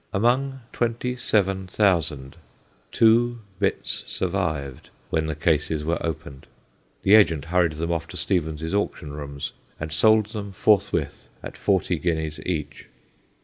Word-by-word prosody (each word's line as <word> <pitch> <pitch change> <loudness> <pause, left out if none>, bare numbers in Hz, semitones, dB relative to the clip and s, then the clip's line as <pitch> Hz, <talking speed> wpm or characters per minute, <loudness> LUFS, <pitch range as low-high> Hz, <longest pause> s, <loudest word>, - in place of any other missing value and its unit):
Among 130 +6 +1
twenty 120 +1 -1
seven 95 -5 0
thousand 80 -9 0 0.6
two 120 +1 +4 0.2
bits 100 - -1
survived 80 -8 -2 0.2
when 80 -1 +1
the 80 - -2
cases 75 -1 +1
were 85 +2 -1
opened; 70 -4 -5 0.6
the 100 - +4
agent 80 -9 +5
hurried 85 -1 +2
them 85 +2 -3
off 80 -1 -2
to - - -9
Stevens's 80 -3 -1
auction 100 -7 -2
rooms, 70 -1 -5 0.3
and 75 0 -4
sold 110 +6 +5
them 100 -3 -6
forthwith 105 +1 +1 0.2
at - - -7
forty 95 -3 +1
guineas 80 -3 -1
each. 80 -5 -4
85 Hz, 130 wpm, -24 LUFS, 80-105 Hz, 0.6 s, agent